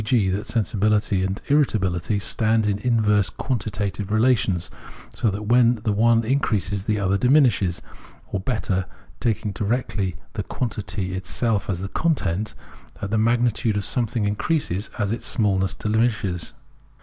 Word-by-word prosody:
g., 105 -3 +2
that 100 +3 -2
sensibihty 105 -3 +1
and 95 +2 -3
irritabihty 105 - +1
stand 110 +1 +1
in 100 -1 0
inverse 105 -4 +2
quantitative 105 -5 -3
relations, 110 -6 +2 0.4
so 115 - +1
that 100 +2 -4
when 120 +1 +4
the 110 - +1
one 115 +2 +3
increases 105 -6 0
the 105 -1 +1
other 100 0 +1
diminishes; 125 - +3 0.5
or 100 - -1
better, 95 -3 -1 0.3
taking 110 -2 -1
directly 100 -3 -1 0.2
the 110 - -3
quantity 100 -4 -3
itself 100 +3 -1
as 90 -2 -2
the 95 - -3
content, 105 - -1 0.4
that 100 - -4
the 110 - +2
magnitude 115 -1 +2
of 100 - -2
something 115 -1 0
increases 105 - -1
as 105 -1 0
its 115 - -3
smallness 95 -4 +1
diminishes. 110 -5 -1
105 Hz, 135 wpm, -23 LUFS, 95-115 Hz, 0.5 s, when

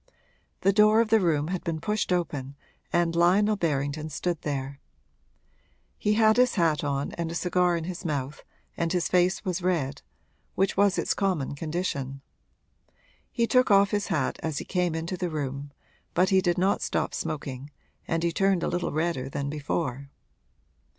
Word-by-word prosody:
The 195 - +3
door 215 +2 +5
of 230 -1 +2
the 225 - +6
room 160 -5 +1
had 185 -1 -3
been 165 -3 -2
pushed 210 +2 -1
open 145 -6 -2 0.4
and 170 -1 +1
Lionel 195 +5 +4
Berrington 150 -3 -1
stood 170 +2 -2
there. 140 -1 -4 1.2
He 210 - +1
had 220 0 +4
his 250 0 +4
hat 165 -6 +2
on 140 -1 -1
and 165 -1 -1
a - - -5
cigar 180 0 +2
in 165 - -4
his 180 +2 -6
mouth 140 -4 -3 0.3
and 170 -1 -1
his 180 -2 +1
face 180 +3 +2
was 185 -1 -1
red, 155 -6 -1 0.5
which 195 +1 +1
was 200 0 +3
its - - +1
common 185 -10 -1
condition. 140 -4 -3 1.1
He 235 -2 +1
took 255 +2 +3
off 200 0 +5
his 205 0 0
hat 155 -9 -1
as 160 -3 -3
he - - -4
came 180 -3 0
into 165 +3 -3
the 180 -1 -2
room, 140 -2 -4 0.4
but 185 +2 +3
he 190 -1 +4
did 175 -1 +1
not 190 +2 +2
stop - - -1
smoking 140 -4 -4 0.4
and 165 0 -1
he 170 - +1
turned 195 0 +2
a - - +1
little 175 0 -1
redder 155 -4 -1
than 140 +1 -3
before. 140 -2 -3
170 Hz, 170 wpm, -27 LUFS, 145-190 Hz, 1.2 s, the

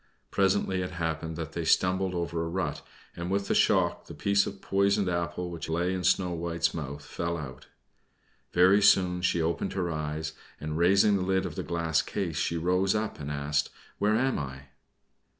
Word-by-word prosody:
Presently 95 -1 +1
it 90 - -3
happened 80 -1 -3
that 80 -1 -5
they 85 +1 -3
stumbled 95 +3 +2
over 85 -1 -2
a - - -3
rut, 85 -4 -2 0.3
and 85 +1 -4
with 100 +1 0
the - - +1
shock - - +2
the - - -9
piece 100 0 +2
of 100 - -7
poisoned 100 0 +1
apple 85 0 -2
which 85 -1 -6
lay 85 +3 0
in 90 -1 -3
Snow 90 -1 +2
White's 85 0 -1
mouth 70 -2 -6
fell 85 0 -3
out. 65 -5 -8 0.8
Very 95 +3 +5
soon 90 -3 +4
she 85 -2 +1
opened 85 +1 -1
her 90 -3 -1
eyes, 75 0 -3 0.3
and 75 0 -4
raising 100 +4 +4
the - - -2
lid 95 +1 +1
of 90 - -4
the - - -4
glass 80 -2 0
case, 85 -2 -3
she 85 0 0
rose 90 +4 +1
up 105 0 -2
and 70 -1 -5
asked, 70 0 -1 0.3
"Where 105 +1 +3
am 130 +3 +1
I?" 70 -1 -7
85 Hz, 185 wpm, -28 LUFS, 80-95 Hz, 0.8 s, Very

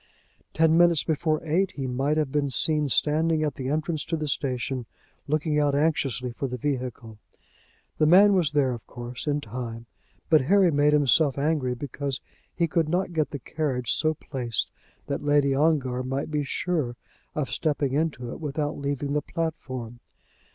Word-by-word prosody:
Ten 160 0 +4
minutes 170 -3 +5
before 155 0 0
eight 180 +5 +1
he 135 - -4
might 135 +4 0
have 150 -3 0
been 145 -1 0
seen 150 +2 +3
standing 155 +3 +2
at 150 -2 0
the 130 0 -4
entrance 155 +1 -1
to 165 - -2
the 155 -1 -3
station 130 -3 -2 0.4
looking 150 +1 +1
out 145 -1 +2
anxiously 135 -5 0
for 135 +3 -3
the 125 0 -4
vehicle. 125 -5 -4 0.8
The 155 - +4
man 200 +5 +7
was 170 -6 +2
there, 140 -3 +3
of 115 - -9
course, 125 +3 -7
in 145 0 +1
time, 115 -1 -6 0.4
but 155 -2 +5
Harry 185 +5 +4
made 145 0 +3
himself 145 0 +3
angry 140 -4 0
because 140 0 -4 0.4
he 170 - +1
could 160 -1 0
not 180 +1 0
get 155 -2 0
the 145 - -5
carriage 130 -2 -2
so 155 0 +1
placed 120 -6 -3 0.3
that 140 - -3
Lady 145 -1 +3
Ongar 135 -4 +1
might 135 +4 -3
be 150 -1 0
sure 145 -4 -1 0.4
of 150 -3 -2
stepping 145 -4 0
into 140 -5 -1
it - - -7
without 150 -1 -3
leaving 140 0 -2
the 150 - +1
platform. 130 -9 -5
145 Hz, 170 wpm, -26 LUFS, 130-155 Hz, 0.8 s, man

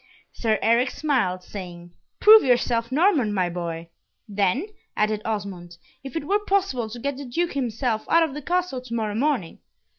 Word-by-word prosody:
Sir 220 -2 0
Eric 235 +3 +3
smiled, 240 -12 -1
saying, 175 -3 -9 0.3
"Prove 435 +1 +9
yourself 240 -2 +1
Norman, 295 - +3
my 185 -3 0
boy." 170 -1 -5 0.4
"Then," 205 - 0 0.3
added 215 0 +1
Osmond, 190 -5 -5 0.3
"if 270 -2 -9
it 325 - -3
were 410 +3 +2
possible 375 - 0
to 230 - -8
get 280 +2 -3
the 280 - -7
Duke 335 +8 -1
himself 240 -3 -2
out 335 0 +5
of 315 -4 -2
the 295 - -6
castle 350 -4 -1
to 250 -2 -6
morrow 215 -2 -1
morning. 240 - -1
235 Hz, 170 wpm, -24 LUFS, 200-285 Hz, 0.4 s, Prove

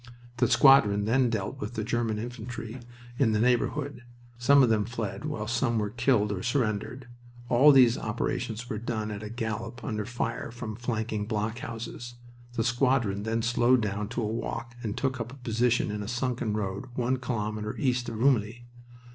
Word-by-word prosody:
The - - +3
squadron 105 -8 +6
then 125 +3 +3
dealt 110 +3 -3
with 125 - -5
the 110 - -2
German 115 -1 -1
infantry 115 +1 -6 0.4
in 115 -6 +3
the 105 - +2
neighborhood. 125 +4 +1 0.4
Some 140 +3 +6
of 125 - +4
them 110 -2 +3
fled, 115 +3 -4
while 145 -9 -3
some 115 +1 0
were 105 -2 -1
killed 115 -3 +2
or 95 -3 -3
surrendered. 120 +1 -1 0.4
All 135 +5 +7
these 125 -3 +6
operations 115 +1 -3
were 105 - -3
done 110 -2 -3
at 105 -1 -5
a 105 - -6
gallop 115 +1 -4
under 110 -5 -3
fire 120 -1 -3
from 115 -2 -6
flanking 110 -3 -2
blockhouses. 115 +2 -4 0.4
The 115 - 0
squadron 120 -4 +1
then 110 +1 -1
slowed 120 +1 +3
down 105 0 -2
to 120 0 -2
a - - 0
walk 115 +1 -4
and 110 -4 -4
took 130 -2 -1
up 115 +1 -4
a - - -10
position 120 -2 +1
in 105 0 -3
a 100 - -5
sunken 120 -2 -1
road 100 +3 -3
one 125 +1 +1
kilometer 105 -4 -3
east 125 -3 0
of 115 - -6
Rumilly. 115 -1 +1
115 Hz, 175 wpm, -28 LUFS, 110-125 Hz, 0.4 s, All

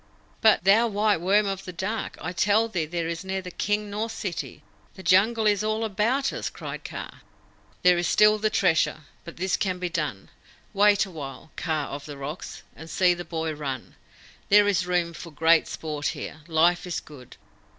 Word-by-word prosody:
"But, 220 -5 +5
thou 210 +5 +5
white 210 -4 +1
worm 200 +4 +3
of 195 -1 -3
the 180 - -7
dark, 200 +5 -4
I 180 - -4
tell 210 +5 +3
thee 175 -8 -2
there 170 0 -2
is 165 +1 -4
neither 190 -1 -4
king 210 +3 -1
nor 215 +3 -2
city! 200 -5 -5 0.3
The 190 - -11
Jungle 215 +6 +4
is 210 0 +3
all 215 +1 0
about 230 +7 0
us!" - - -3
cried - - -7
Kaa. - - -8 0.6
"There 180 -1 +5
is 175 - 0
still 210 +3 +5
the 215 +1 +1
Treasure. 170 -6 +2 0.2
But 170 - -10
this 185 +1 0
can 185 -2 -1
be 180 -1 -3
done. 150 - -3 0.4
Wait 205 +1 +4
awhile, 155 -4 -9
Kaa 155 -3 -2
of 145 +1 -7
the 145 -2 -8
Rocks, 145 +6 -7
and 160 - -11
see 180 +2 +3
the 175 0 -6
boy 160 -1 -3
run. 140 -4 -5 0.6
There 205 0 +6
is 185 -3 +1
room 175 -2 0
for 170 +1 -9
great 160 +1 +3
sport 150 -2 -4
here. 160 - -7
Life 170 +2 +2
is 175 - -2
good. 135 -5 -14
180 Hz, 185 wpm, -25 LUFS, 160-210 Hz, 0.6 s, There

